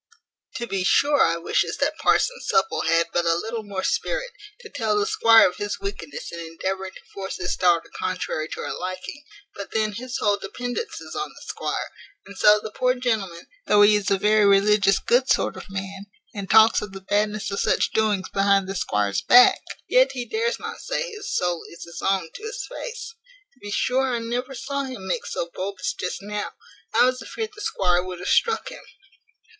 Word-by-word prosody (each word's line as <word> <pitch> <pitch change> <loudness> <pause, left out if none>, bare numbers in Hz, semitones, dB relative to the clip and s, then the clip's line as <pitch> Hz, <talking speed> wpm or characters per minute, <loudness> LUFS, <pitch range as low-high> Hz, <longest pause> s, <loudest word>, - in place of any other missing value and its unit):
To 235 - -3
be 195 -5 -2
sure 285 +9 +3
I 170 - +3
wishes 170 - 0
that - - -1
parson - - +2
Supple 195 -1 +1
had 165 +1 +2
but 175 - +1
a 165 - +4
little 225 +6 -3
more 200 -3 -5
spirit, - - -1 0.3
to - - -10
tell 215 -2 -1
the 205 - +2
squire 225 -1 +6
of 180 - -6
his 205 0 -3
wickedness 195 -7 -6
in 170 - -7
endeavouring 190 +3 -4
to - - -13
force 195 -1 -5
his 180 0 -2
daughter 175 -2 +2
contrary 180 -4 -3
to - - -6
her - - -4
liking; 185 +10 -6 0.3
but 200 - -8
then 215 -1 +1
his 245 +4 -5
whole 205 -1 +2
dependance 245 - -5
is - - -9
on 405 - -3
the - - -14
squire; - - -4 0.3
and 200 - -12
so 210 +2 +6
the 215 0 -7
poor 250 +3 +1
gentleman, 220 -9 -2 0.2
though 205 0 +6
he 210 +1 +6
is 205 -1 0
a 195 - +3
very 210 +2 +3
religious 200 0 +4
good 255 +2 +2
sort - - +2
of - - -10
man, 195 0 -6 0.3
and 200 -2 -6
talks 220 +1 +6
of 210 -2 -7
the 195 - -8
badness 210 +1 -1
of 200 - -2
such - - +1
doings 210 -4 +1
behind 195 -1 +2
the 195 - -3
squire's 105 - 0
back, 250 +1 +6 0.3
yet - - +4
he 250 -2 -4
dares 460 - -1
not - - -6
say - - -3
his 430 -1 -7
soul 175 -2 0
is 170 - -10
his 170 - -9
own 190 -4 0
to - - -10
his 445 +2 -5
face. 480 -2 -7 0.4
To 260 - -30
be 205 - -8
sure 260 +5 +1
I - - 0
never 245 +3 -3
saw 280 +3 -3
him 255 -8 -7
make 185 - -2
so 170 - -4
bold 195 +1 -4
as - - -1
just 180 +2 -5
now; 210 0 -4 0.4
I 245 - +5
was 255 0 0
afeard 445 -1 -5
the 420 - -11
squire 180 - +1
would 185 0 -6
have 180 - -7
struck 460 +1 +2
him. - - -10
205 Hz, 205 wpm, -24 LUFS, 190-250 Hz, 0.4 s, squire